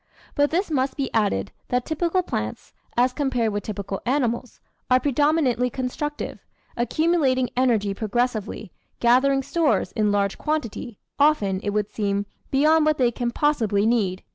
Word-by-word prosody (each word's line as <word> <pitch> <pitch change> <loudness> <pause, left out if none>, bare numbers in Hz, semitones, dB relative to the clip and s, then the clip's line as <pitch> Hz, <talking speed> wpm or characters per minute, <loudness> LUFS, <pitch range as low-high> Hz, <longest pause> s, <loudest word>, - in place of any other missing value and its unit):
But 290 0 +2
this 345 +2 -1
must 270 -1 0
be 275 -2 -2
added, 205 - 0 0.2
that 250 0 0
typical 340 +3 0
plants, 110 - -5 0.2
as 250 +1 +3
compared 250 -7 0
with 205 - -1
typical 200 -2 -5
animals, 245 -2 -1 0.3
are 255 0 +5
predominantly 280 -3 +2
constructive, 265 +4 -4 0.4
accumulating 265 -1 +1
energy 230 -6 +2
progressively, 220 -2 -2 0.3
gathering 270 +3 +3
stores 330 +2 +1
in 210 -3 +1
large 200 -1 0
quantity, 250 -7 -3 0.2
often, 215 -11 +3
it 205 - -2
would 210 0 -1
seem, 200 -1 -1 0.2
beyond 305 +3 +4
what 305 0 +2
they 245 -2 +3
can 240 0 -2
possibly 230 -7 +1
need. 205 -5 +1
250 Hz, 140 wpm, -24 LUFS, 210-290 Hz, 0.4 s, are